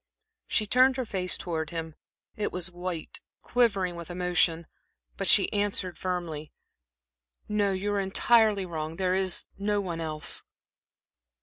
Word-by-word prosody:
She 215 Hz, -, +1 dB
turned 255 Hz, +4 st, +4 dB
her 255 Hz, -, -2 dB
face 185 Hz, -4 st, 0 dB
towards 160 Hz, -3 st, -3 dB
him. 165 Hz, -1 st, -5 dB, 0.4 s
It 210 Hz, -, -2 dB
was 180 Hz, 0 st, -3 dB
white, 175 Hz, -2 st, -5 dB, 0.2 s
quivering 200 Hz, -7 st, +1 dB
with 170 Hz, 0 st, -8 dB
emotion; 175 Hz, -2 st, +1 dB, 0.5 s
but -, -, -3 dB
she -, -, +6 dB
answered 200 Hz, -3 st, -1 dB
firmly: 170 Hz, -5 st, -4 dB, 1.0 s
"No, 210 Hz, -2 st, +1 dB
you 195 Hz, +2 st, -2 dB
are 200 Hz, -, +1 dB
entirely 205 Hz, +1 st, +3 dB
wrong. 160 Hz, -2 st, -5 dB
There 185 Hz, +1 st, 0 dB
is 190 Hz, -2 st, +3 dB
no 205 Hz, +1 st, 0 dB
one 175 Hz, -4 st, -4 dB
else." 155 Hz, -1 st, -1 dB
185 Hz, 135 wpm, -28 LUFS, 170-205 Hz, 1.0 s, she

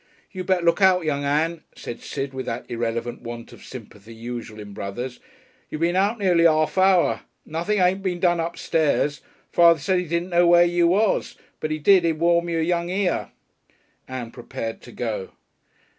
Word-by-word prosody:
"You 185 Hz, -2 st, -5 dB
better 180 Hz, -2 st, +1 dB
look 170 Hz, +4 st, +3 dB
out, 185 Hz, -3 st, +4 dB
young 145 Hz, -2 st, -1 dB
Ann," 155 Hz, +3 st, 0 dB
said 120 Hz, -, -8 dB
Sid, 135 Hz, -1 st, -5 dB
with 130 Hz, 0 st, -5 dB
that 115 Hz, +1 st, -4 dB
irreverent 115 Hz, 0 st, -3 dB
want 115 Hz, 0 st, -8 dB
of -, -, -14 dB
sympathy 115 Hz, -2 st, -11 dB
usual 115 Hz, -1 st, -7 dB
in 105 Hz, -1 st, -9 dB
brothers. 120 Hz, +7 st, -5 dB, 0.5 s
"You -, -, -4 dB
been 170 Hz, +3 st, +1 dB
out 200 Hz, +5 st, +2 dB
nearly 180 Hz, -5 st, +3 dB
'arf 155 Hz, -1 st, +1 dB
hour. 185 Hz, -2 st, +3 dB, 0.2 s
Nothing 170 Hz, +7 st, -1 dB
ain't 185 Hz, +1 st, +2 dB
been 180 Hz, -2 st, -2 dB
done 175 Hz, -1 st, +2 dB
upstairs. 160 Hz, -3 st, 0 dB, 0.3 s
Father 170 Hz, -2 st, +6 dB
said 180 Hz, +6 st, +1 dB
he 180 Hz, -, -3 dB
didn't 170 Hz, +3 st, -1 dB
know 175 Hz, 0 st, +4 dB
where 175 Hz, 0 st, +6 dB
you 175 Hz, 0 st, +2 dB
was, 200 Hz, +4 st, +1 dB, 0.2 s
but 155 Hz, -, -3 dB
when -, -, -1 dB
he -, -, -2 dB
did 180 Hz, +4 st, +5 dB
he'd 165 Hz, -1 st, +2 dB
warm 170 Hz, +2 st, +2 dB
y'r 165 Hz, -1 st, 0 dB
young 170 Hz, +1 st, 0 dB
ear." 185 Hz, -1 st, -1 dB, 0.8 s
Ann 125 Hz, -3 st, -6 dB
prepared 115 Hz, -2 st, -6 dB
to 120 Hz, -, -13 dB
go. 110 Hz, -5 st, -4 dB
165 Hz, 185 wpm, -23 LUFS, 125-175 Hz, 0.8 s, Father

